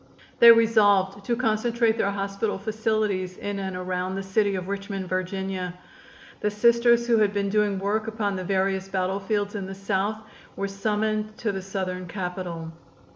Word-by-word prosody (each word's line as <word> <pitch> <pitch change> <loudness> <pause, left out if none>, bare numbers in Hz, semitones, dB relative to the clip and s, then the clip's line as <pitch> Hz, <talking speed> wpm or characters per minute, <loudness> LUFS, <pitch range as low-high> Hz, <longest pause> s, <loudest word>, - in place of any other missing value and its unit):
They 235 0 +11
resolved 205 -4 +4
to 235 - +1
concentrate 230 0 +1
their 200 - +1
hospital 200 +1 -2
facilities 210 -3 -1
in 205 -1 -4
and 190 -1 -4
around 180 +1 -3
the 195 - -3
city 200 +1 +1
of 185 -1 -4
Richmond, 200 -1 -4
Va. 185 0 -3 0.6
The 210 - 0
Sisters 235 +2 +4
who 235 -1 +3
had 205 -1 +3
been 200 -1 0
doing 210 -1 +1
work 210 +3 -1
upon 215 -3 -1
the 185 - -4
various 190 0 0
battlefields 195 +2 -1
in 200 -3 -4
the 195 - -7
South 195 +2 -1 0.4
were 200 - -2
summoned 215 +2 -1
to 220 - -1
the 195 -1 -4
Southern 185 -1 -4
Capital. 180 -2 -5
200 Hz, 160 wpm, -25 LUFS, 190-215 Hz, 0.6 s, They